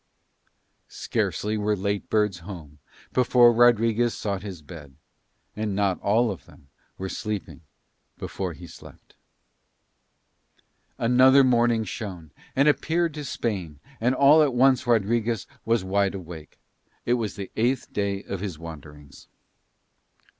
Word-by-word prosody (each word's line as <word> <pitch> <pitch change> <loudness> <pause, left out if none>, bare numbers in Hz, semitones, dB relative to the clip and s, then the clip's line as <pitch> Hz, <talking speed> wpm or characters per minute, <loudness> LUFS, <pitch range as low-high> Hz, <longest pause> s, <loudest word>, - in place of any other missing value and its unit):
Scarcely 105 +1 -2
were 105 0 +1
late 100 +1 -3
birds 105 -4 +1
home 80 -5 -10 0.3
before 125 -1 +5
Rodriguez 115 0 +3
sought 100 -3 -3
his 95 -6 -8
bed, 75 -3 -12 0.6
and 105 -2 -3
not 100 -2 0
all 110 +3 +2
of 95 - -9
them 70 - -19 0.3
were 95 - -4
sleeping 105 -4 -5 0.6
before 95 -3 -5
he 85 +3 -11
slept. 85 - -15 1.8
Another 130 +3 +5
morning 120 -3 +3
shone, 90 -7 -7 0.2
and 140 +2 +3
appeared 165 +2 +1
to 150 -1 -6
Spain, 95 - -4 0.2
and 125 +3 +1
all 140 +4 +6
at 140 -5 +2
once 130 0 +3
Rodriguez 115 -1 +1 0.2
was 115 -3 +1
wide 100 +1 0
awake. 85 -4 -10 0.5
It 120 - +2
was 115 -4 -2
the 100 -2 -7
eighth 120 +3 -1
day 100 -1 -2
of 100 - -5
his 95 -5 -5
wanderings. 75 -3 -12
105 Hz, 125 wpm, -25 LUFS, 95-120 Hz, 1.8 s, all